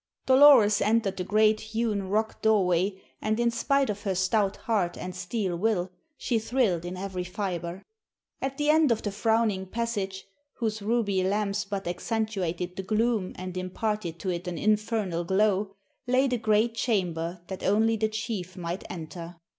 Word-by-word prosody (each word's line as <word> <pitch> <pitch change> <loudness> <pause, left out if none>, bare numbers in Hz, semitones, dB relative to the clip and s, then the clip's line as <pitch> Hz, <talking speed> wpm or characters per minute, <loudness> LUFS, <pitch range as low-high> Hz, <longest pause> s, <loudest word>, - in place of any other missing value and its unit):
Dolores 260 -6 +7
entered 210 -2 +1
the 180 - -2
great 215 +2 +3
hewn 220 -3 -2
rock 215 +2 -1
doorway 190 -3 +2 0.2
and 215 +1 0
in 235 0 +2
spite 275 +3 +1
of 205 -1 -3
her 195 -3 -1
stout 195 +2 +1
heart 195 -7 -1
and 180 0 -6
steel 185 0 -2
will 185 -1 0 0.3
she 235 -3 0
thrilled 220 -7 0
in 180 +1 -5
every 185 -1 -4
fiber. 180 -1 -4 0.6
At 270 0 -3
the 295 0 +3
end 310 -4 +4
of 225 - 0
the 205 - -2
frowning 215 -2 +1
passage, 200 -3 -3 0.3
whose 220 -3 -2
ruby 205 -3 +1
lamps 205 +1 0
but 200 -2 -4
accentuated 180 -3 -2
the - - -1
gloom 215 0 0
and 185 0 -6
imparted 185 -1 -3
to 190 - -1
it 175 +1 -4
an 175 - -3
infernal 210 -4 0
glow, 195 +2 +1 0.3
lay 255 +2 +3
the 250 -2 -1
great 220 +1 +2
chamber 180 -7 -1
that 190 +1 -7
only 220 +3 +3
the 220 0 0
chief 215 -5 -4
might 175 +1 -4
enter. 170 +1 -7
205 Hz, 160 wpm, -27 LUFS, 185-225 Hz, 0.6 s, Dolores